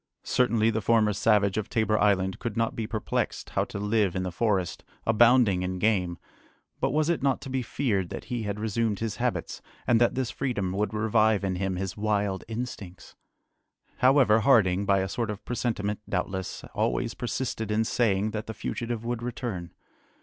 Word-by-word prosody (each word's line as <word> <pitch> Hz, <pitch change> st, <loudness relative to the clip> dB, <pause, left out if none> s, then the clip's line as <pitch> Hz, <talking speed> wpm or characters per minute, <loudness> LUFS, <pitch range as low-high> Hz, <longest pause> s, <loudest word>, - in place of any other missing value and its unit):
Certainly, 115 Hz, -3 st, +2 dB
the 110 Hz, 0 st, -1 dB
former 105 Hz, 0 st, +3 dB
savage 100 Hz, -1 st, +2 dB
of 105 Hz, -, -5 dB
Tabor 110 Hz, -1 st, +1 dB
Island 95 Hz, -2 st, +2 dB
could 115 Hz, -2 st, -4 dB
not 115 Hz, 0 st, 0 dB
be 110 Hz, -2 st, -3 dB
perplexed 110 Hz, -2 st, -2 dB
how -, -, +1 dB
to -, -, -7 dB
live 105 Hz, -2 st, +1 dB
in 95 Hz, -, -1 dB
the 90 Hz, -, -3 dB
forest, 95 Hz, -2 st, 0 dB, 0.2 s
abounding 115 Hz, -4 st, +5 dB
in 90 Hz, 0 st, -2 dB
game, 90 Hz, -4 st, +1 dB, 0.6 s
but -, -, +1 dB
was 155 Hz, +3 st, +1 dB
it 170 Hz, -3 st, +1 dB
not 135 Hz, -1 st, +1 dB
to 135 Hz, -1 st, -7 dB
be 130 Hz, 0 st, 0 dB
feared 110 Hz, -7 st, -1 dB
that -, -, -6 dB
he 120 Hz, -2 st, -3 dB
had 105 Hz, -1 st, -3 dB
resumed 110 Hz, 0 st, 0 dB
his 110 Hz, -1 st, -3 dB
habits, 125 Hz, 0 st, -2 dB, 0.2 s
and 120 Hz, -1 st, +3 dB
that 120 Hz, -, +3 dB
this 130 Hz, -2 st, -1 dB
freedom 110 Hz, -9 st, -2 dB
would 100 Hz, +2 st, -1 dB
revive 110 Hz, -1 st, +2 dB
in 95 Hz, -2 st, -1 dB
him 95 Hz, 0 st, -1 dB
his 95 Hz, 0 st, -3 dB
wild 105 Hz, -2 st, 0 dB
instincts? 110 Hz, -5 st, -7 dB, 0.8 s
However, 130 Hz, -4 st, +5 dB
Harding, 100 Hz, -6 st, +3 dB
by 100 Hz, -1 st, +4 dB
a 95 Hz, -, -1 dB
sort 115 Hz, +3 st, -2 dB
of 105 Hz, 0 st, -6 dB
presentiment, 105 Hz, -4 st, -2 dB
doubtless, 95 Hz, 0 st, -3 dB
always -, -, 0 dB
persisted 115 Hz, -2 st, -3 dB
in 105 Hz, +1 st, +2 dB
saying 110 Hz, -3 st, +1 dB
that 110 Hz, 0 st, -5 dB
the 110 Hz, -, -6 dB
fugitive 115 Hz, -1 st, -4 dB
would 120 Hz, -1 st, -2 dB
return. 120 Hz, -7 st, -4 dB
110 Hz, 180 wpm, -27 LUFS, 100-115 Hz, 0.8 s, abounding